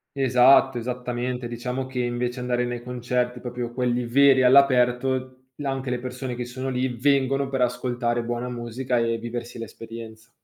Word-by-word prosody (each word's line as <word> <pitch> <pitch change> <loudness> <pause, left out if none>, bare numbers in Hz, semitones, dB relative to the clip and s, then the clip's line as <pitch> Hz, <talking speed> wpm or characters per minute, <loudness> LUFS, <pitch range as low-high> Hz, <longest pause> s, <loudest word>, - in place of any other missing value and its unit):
Esatto, 130 0 +5
esattamente, 125 0 -3
diciamo 125 +2 -3
che 130 -1 -5
invece 120 +1 -2
andare 125 0 0
nei 120 -1 -4
concerti 125 0 -2
proprio 120 -1 -5
quelli 125 -1 0
veri, 135 +1 +5
all'aperto, 130 0 +3
là 145 -2 -3
anche 135 -1 -4
le 125 - -1
persone 125 0 -5
che 125 - -3
sono 130 +2 -5
lì 130 0 0
vengono 135 +1 +2
per 135 -2 -1
ascoltare 120 -1 0
buona 120 +1 -3
musica 120 +1 -3
e 115 0 +1
viversi 120 0 -6
l'esperienza. 115 0 -9
125 Hz, 155 wpm, -24 LUFS, 120-130 Hz, -, Esatto